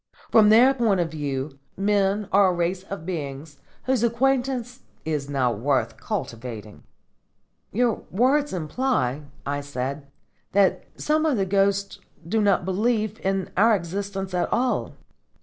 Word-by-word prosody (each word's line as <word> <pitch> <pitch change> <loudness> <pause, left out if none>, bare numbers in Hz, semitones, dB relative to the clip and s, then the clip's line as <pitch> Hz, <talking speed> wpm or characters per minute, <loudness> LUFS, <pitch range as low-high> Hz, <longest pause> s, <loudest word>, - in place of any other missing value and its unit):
From 215 -2 +6
their 245 +5 +7
point 225 -7 +1
of 170 -2 -1
view, 140 -2 -4 0.2
men 200 0 +1
are 200 0 +5
a 185 - +2
race 175 +2 -1
of 195 -5 -7
beings 145 -4 -6 0.2
whose 255 -3 +1
acquaintance 245 +1 0 0.3
is 150 -3 -2
not 125 -6 0
worth 135 +3 0
cultivating." 115 -3 -6 0.9
"Your 235 +2 +1
words 270 +8 +2
imply," 155 - -1 0.2
I 145 0 -2
said, 140 0 -5 0.5
"that 195 -1 +3
some 310 +1 +1
of 305 -6 +2
the 195 - +1
ghosts 200 +1 +1 0.3
do 220 +5 +1
not 200 -4 +2
believe 215 +2 0
in 195 -1 -1
our 220 +4 +5
existence 195 +1 -4
at 180 - 0
all." 250 0 0
195 Hz, 135 wpm, -24 LUFS, 150-225 Hz, 0.9 s, their